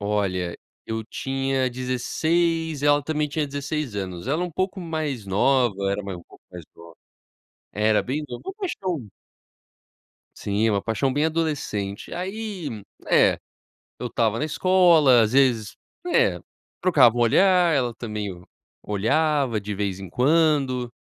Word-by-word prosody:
olha, 95 -4 -1 0.3
eu 110 0 -3
tinha 135 +1 -1
16, 160 +5 -1
ela 145 0 +4
também 150 0 -1
tinha 150 +1 -1
16 145 -4 -4
anos, 95 +1 -5
ela 160 +5 0
um 180 - -5
pouco 185 +4 -2
mais 155 - -3
nova, 100 -1 +2
era 100 +1 -2
mais 95 -2 -6
um 85 - -13
pouco - - -20
mais 90 -2 -9
nova. 85 -1 -14 0.8
Era 105 0 +2
bem 150 +4 -3
novo, 120 - -7
uma 385 - -5
paixão. 185 - -4 1.3
Sim, 105 +2 0
uma 100 -1 0
paixão 130 +4 0
bem 145 +3 +1
adolescente. 145 -12 -3
Aí, 190 -1 -4 0.4
é, - - +4 0.6
eu 125 - -3
estava 115 -1 0
na 150 - 0
escola, 160 -7 +5
às 110 - +1
vezes, 120 -6 +2 0.3
né, 355 - +2 0.4
trocava 145 -11 +5
o - - 0
olhar, 180 - +4
ela 125 -5 0
também 105 -3 -4
o 90 -1 -12 0.4
olhava 135 +3 +1
de 105 +1 -5
vez 100 -2 -3
em 95 -2 -8
quando. 135 - +2
130 Hz, 145 wpm, -24 LUFS, 105-155 Hz, 1.3 s, escola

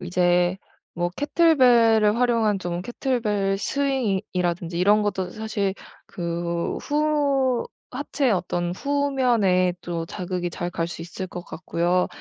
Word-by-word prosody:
이제 180 0 +2 0.4
뭐 175 0 0
케틀벨을 245 -9 +4
활용한 230 -5 +2
좀 175 -1 -3
케틀벨 210 -3 -1
스윙이 265 -6 0
이라든지 175 -1 -1
이런 205 +3 +4
것도 190 -3 -2
사실 205 -2 -2 0.3
그 170 -1 -3
후 285 -4 +1 0.2
하체의 270 -1 0
어떤 175 -2 -1
후면에 245 -8 +2
또 170 -2 -4
자극이 180 -2 -4
잘 175 +1 -4
갈 165 -1 -2
수 170 -1 -7
있을 180 +3 -6
것 175 -1 -8
같고요. 175 +1 0
195 Hz, 245 characters per minute, -24 LUFS, 175-245 Hz, 0.4 s, 케틀벨을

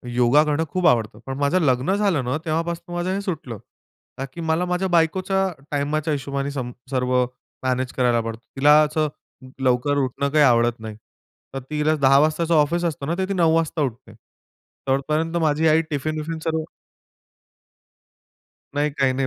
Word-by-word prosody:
योगा 125 +5 +5
करणं 150 +1 0
खूप 185 +1 +1
आवडतं. 110 -3 +1
पण 135 0 -5
माझं 145 +6 +2
लग्न 135 +5 +2
झालं 195 -10 +1
ना, 125 +5 -1
तेव्हापासून 170 +2 -3
माझं 175 +1 -1
हे 200 - -2
सुटलं. 155 - -5 0.6
का 135 - -3
की 170 - -7
मला 160 +2 0
माझ्या 180 +1 -1
बायकोच्या 190 +4 +1 0.2
टाईमाच्या 150 +2 -1
हिशोबाने 140 0 -3
सम 130 -3 -4 0.2
सर्व 125 -1 0 0.5
मॅनेज 130 0 -1
करायला 120 -2 +2
पडतं. 115 0 -6
तिला 145 +2 +6
असं 155 +1 0 0.6
लवकर 130 +3 +2
उठणं 140 +1 -1
काही 150 +1 +4
आवडत 120 -2 +3
नाही. 110 -1 -7 0.6
तर 135 - -3
तिला 155 +1 +1
10:00 135 0 +6
वाजताच 155 +3 +1
ऑफिस 165 +2 +3
असतं 145 -4 -3
ना, 170 - 0
तर 190 - 0
ती - - 0
9:00 165 -3 +3
वाजता 165 -1 0
उठते. 125 -5 -4 0.7
तोपर्यंत 155 +5 0
माझी 155 0 +2
आई 160 +1 +4
टिफिन-विफिन 155 +2 -3
सर्व 160 -1 -1 2.1
नाही. 145 +1 +1
काही 135 -2 +1
नाही 135 +1 -1
150 Hz, 160 wpm, -22 LUFS, 130-165 Hz, 2.1 s, तिला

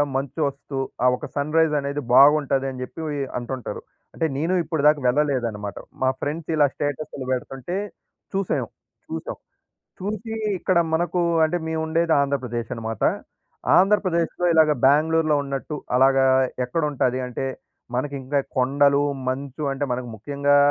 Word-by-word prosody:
మంచు 135 +3 -3
వస్తు, 140 0 -6 0.3
ఆ - - +6
ఒక 125 - -7
సన్రైజ్ 155 +2 +2
అనేది 140 +1 -3
బాగుంటదని 135 -2 +4
చెప్పి 145 +6 -8 0.2
ఇ - - -2 0.2
అంటుంటారు. 125 +1 -5 0.3
అంటే 165 - -1
నేను 165 +6 0
ఇప్పటి 160 -2 -2
దాకా 150 0 +5
వెళ్ళలేదనమాట. 125 -7 0 0.2
మా 130 - +3
ఫ్రెండ్స్ 155 +3 -4
ఇలా 150 -2 +5
స్టేటస్లు 145 -1 -4
పెడుతుంటే 130 +5 -3 0.6
చూసాం, 195 -1 -1 0.4
చూసాం. - - -5 0.6
చూసి 215 +3 -4 0.2
ఇక్కడ 185 0 +2 0.2
మనకు 175 +2 0 0.2
అంటే 160 +3 0
మేము 160 0 -1
ఉండేది 165 +1 +1
ఆంధ్రప్రదేశ్ 125 -5 -2
అనమాట. 115 -2 -5 0.8
ఆంధ్రప్రదేశ్‌లో 185 -3 +2
ఇలాగ 160 -1 +5
బెంగుళూరులో 155 +3 +4
ఉన్నట్టు 140 +2 -4 0.2
అలాగా 135 +1 +5 0.4
ఎక్కడుంటది 130 -2 0
అంటే 125 +2 -4 0.5
మనకి 140 +3 -2
ఇంకా 140 +2 0 0.2
కొండలు, 140 +2 +3 0.3
మంచు 135 +2 -4
అంటే 135 +1 -2
మనకు 125 -1 -5
ముఖ్యంగా 140 +5 +1
145 Hz, 130 wpm, -23 LUFS, 130-160 Hz, 0.8 s, ఆ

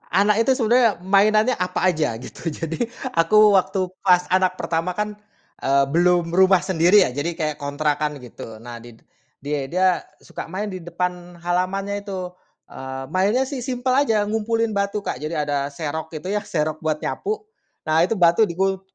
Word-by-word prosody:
anak 210 +3 +4
itu 260 +2 +2
sebenarnya 235 -1 +3
mainannya 215 +5 +4
apa 185 -2 -1
aja, 155 -10 +1
gitu, 130 +7 -6
jadi 165 +9 -3 0.2
aku 210 +5 +5
waktu 190 0 +2 0.2
pas 180 -2 +4
anak 185 0 +2
pertama 165 +2 -2
kan, 210 0 -2 0.5
eee, 140 +1 +3
belum 175 0 +2
rumah 190 +1 +6
sendiri 185 +2 +5
ya, 125 - -4
jadi 160 +5 -3
kayak 155 -3 -1
kontrakan, 150 +1 -1
gitu. 115 -3 -10
Nah, 120 +1 -9
di 120 -1 -14 0.4
dia 140 -1 -3
dia 185 +2 +2 0.3
suka - - -9
main 190 +5 -3
di 185 - -6
depan 175 0 -4
halamannya 185 +4 -1
itu, 185 -3 -6 0.3
eee, 130 0 -7
mainnya 205 +8 +2
sih 265 -1 -5
simpel 255 0 -1
aja, 225 -7 +2
ngumpulin 225 +1 -1
batu, 200 0 -2
Kak. - - -4
Jadi 155 +2 -3
ada 145 -1 -1
serok 155 +2 -5
itu 185 +6 -4
ya, 210 - 0
serok 155 -6 -2
buat 155 -1 0
nyapu. 425 - -4 0.4
Nah, 155 +1 +3
itu 190 +6 +1
batu 175 +4 +4
dikul 190 +2 -1
180 Hz, 170 wpm, -22 LUFS, 155-205 Hz, 0.5 s, rumah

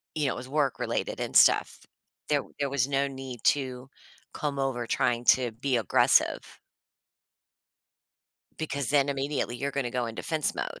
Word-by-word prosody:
you 150 -2 0
know, 135 - 0
it - - -9
was 125 +1 -8
work-related 140 -2 -1
and - - -3
stuff. - - +5 0.5
There - - +2 0.2
there 140 -1 0
was 140 -2 +1
no 140 0 +1
need 130 -3 -8
to 130 -2 -6 0.5
come 145 -2 -3
over 130 -3 -1
trying 120 +1 0
to 125 -2 +4
be 125 +3 -1
aggressive. 110 -6 +2 2.0
Because 140 -4 -2
then 140 -1 +3
immediately, 140 -3 -2
you're 140 +3 -2
gonna 140 -4 -2
go 120 -1 -2
in 115 - -6
defense 155 -3 -1
mode, - - -5
135 Hz, 155 wpm, -27 LUFS, 125-140 Hz, 2.0 s, stuff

